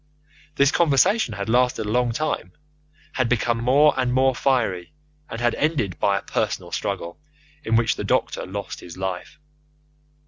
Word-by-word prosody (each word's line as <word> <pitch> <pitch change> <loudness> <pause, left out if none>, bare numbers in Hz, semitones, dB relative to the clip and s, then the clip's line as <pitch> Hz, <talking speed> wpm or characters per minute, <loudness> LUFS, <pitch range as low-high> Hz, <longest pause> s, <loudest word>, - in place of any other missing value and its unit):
This 140 +1 +4
conversation 170 - +2
had 100 -1 -4
lasted 125 -1 +2
a 105 - -3
long 125 0 +1
time, 120 -9 -3 0.6
had 130 -3 0
become 120 -1 0
more 145 +5 +5
and 125 -1 +1
more 130 +1 +3
fiery, 120 -8 0 0.4
and 115 - -6
had 120 -1 +1
ended 145 - -1
by 100 -1 +2
a - - -5
personal - - -2
struggle, 95 -4 -4 0.4
in 115 -3 0
which 115 0 +2
the - - -5
doctor - - -1
lost 100 +1 -6
his 85 0 -11
life. 95 +9 -5
120 Hz, 160 wpm, -23 LUFS, 100-135 Hz, 0.6 s, more